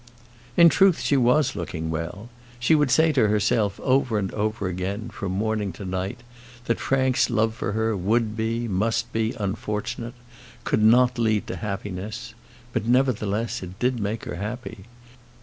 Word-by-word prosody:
In 170 - +9
truth, 190 +1 +4
she 145 - +1
was 125 +1 +3
looking 80 -3 -4
well. 90 +8 -5 0.3
She 125 +6 +3
would 150 -3 +3
say 160 +4 +4
to 130 -7 +3
herself 105 -1 +1
over 130 -4 +2
and 100 -2 -2
over 105 -1 -1
again, 95 +5 -3
from 100 -4 -4
morning 105 0 -1
to 100 - -8
night, 95 +5 -3 0.4
that 115 - 0
Frank's 130 -1 +2
love 110 -1 +1
for 105 -2 -3
her 110 0 0
would 110 +4 0
be, 115 +1 -1
must 115 +4 -1
be, 115 +3 0
unfortunate; 105 +3 -3 0.5
could - - +1
not 120 +3 +5
lead 110 -2 +1
to - - -5
happiness. 105 +3 -5 0.4
But, 110 - -1
nevertheless, 115 -4 +1
it 90 0 -8
did 125 +1 0
make 105 +2 -3
her - - -5
happy. 105 -1 -6
110 Hz, 160 wpm, -24 LUFS, 100-120 Hz, 0.5 s, In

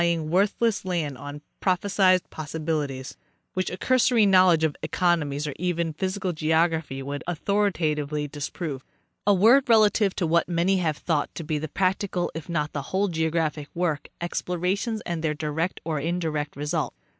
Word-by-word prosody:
207 170 -1 +2
ing 155 - -5
worthless 205 +4 +2
land 170 -7 -2
on 145 +2 -8 0.2
prophesied 185 -1 +2
possibilities, 150 -4 -3 0.4
which 185 -1 -1
a 180 - -5
cursory 245 0 +3
knowledge 185 -4 +5
of 155 -2 +1
economics 155 -3 0
or 150 - -3
even 170 -2 -1
physical 185 +2 -2
geography 160 -3 0
would 140 +1 -5
au 175 - 0
thoritatively 155 -6 0
disprove. 145 -1 -5 0.4
A 205 - +6
word 240 +8 +5
relative 215 -3 +4
to 180 - 0
what 170 +2 +2
many 175 +3 +2
have 160 -5 0
thought 155 -4 0
to 165 - -5
be 155 -1 -2
the 155 - -4
prac 185 +4 +1
tical 180 -3 -2
if 160 +1 -7
not 150 -3 -1
the 145 - -2
whole 195 +2 +1
of 195 - -3
geographic 160 -2 -1
work, 165 -4 -1
explorations 180 +6 -2
and 170 -2 -4
their 155 -1 0
direct 160 +4 -2
or 160 -2 -1
indirect 155 -2 -2
result. 150 +2 -2
165 Hz, 170 wpm, -25 LUFS, 150-185 Hz, 0.4 s, A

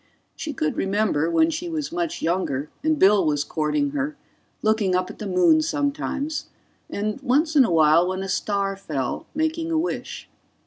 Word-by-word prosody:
She 310 - -5
could 155 - -2
remember, 195 -6 +1
when 320 - +3
she 340 +2 -4
was 310 -3 -3
much 340 -1 -3
younger 160 -5 -1
and 315 0 +2
Bill 200 -4 +5
was 145 -2 +1
courting 275 - -1
her, 290 +1 -3 0.5
looking 215 -4 +2
up 185 0 -1
at - - -15
the 210 - -4
moon 185 - +4
sometimes; 295 0 -2 0.4
and 210 +5 -3
once 290 +5 +1
in 280 - +7
a 185 - -1
while, 160 +1 +5
when 185 +1 -2
a - - -4
star 200 0 -1
fell, 145 -10 -4
making 320 +1 -1
a 325 - +1
wish. 335 +3 -3
215 Hz, 175 wpm, -23 LUFS, -, 0.5 s, in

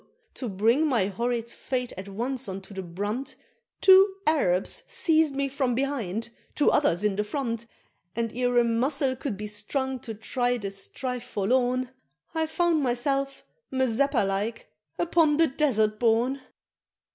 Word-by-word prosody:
to 250 - -5
bring 230 +10 +2
my 235 -9 +2
horrid 235 +3 -2
fate 250 +1 -4
at 190 +2 -7
once 240 +4 -3
unto 190 +1 -7
the 190 - -4
brunt, 205 +9 -4 0.5
Two 385 +1 +7
Arabs 195 - +2
seized 320 -11 +2
me 280 0 0
from 265 -3 -1
behind, 235 -6 -2 0.3
two 295 - +4
others 200 - +2
in 210 -2 +2
the 210 - 0
front, 230 0 -3 0.5
And 230 -1 -2
ere 245 0 +1
a 240 - +6
muscle 260 +3 +1
could 250 -5 -4
be 210 - -5
strung 255 +6 -2
to 225 -2 -7
try 245 +3 -1
the 200 -4 -5
strife 250 +5 -5
forlorn, 250 +3 0 0.4
I 320 -1 0
found 335 -1 +1
myself, 275 +2 -1 0.3
Mazeppa 260 -1 +2
like, 205 +4 -3 0.3
upon 330 -3 +3
the 330 - +6
Desert 220 -8 +1
Born! 245 +4 +2
245 Hz, 145 wpm, -27 LUFS, 215-275 Hz, 0.5 s, Two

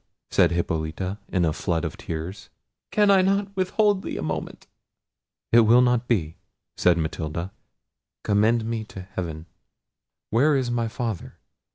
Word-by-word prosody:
said - - +4
Hippolita 85 +3 -2
in 90 -3 +1
a 80 - +1
flood 85 0 -1
of 80 +4 -4
tears, 90 -2 -6 0.4
"can 210 -1 +4
I 195 -1 +6
not 195 +1 0
withhold 195 +1 +2
thee - - -5
a - - -4
moment?" - - -4 0.9
"It 115 - +7
will 120 +2 +6
not 125 -1 +1
be," 80 -9 0 0.4
said 90 -1 +3
Matilda; 80 +2 -3 0.7
"commend 110 +2 +2
me 115 -1 -2
to 95 - -9
heaven—Where 95 - -4
is 130 -3 0
my 120 -1 0
father? 115 -4 -5
110 Hz, 140 wpm, -24 LUFS, 85-125 Hz, 0.9 s, It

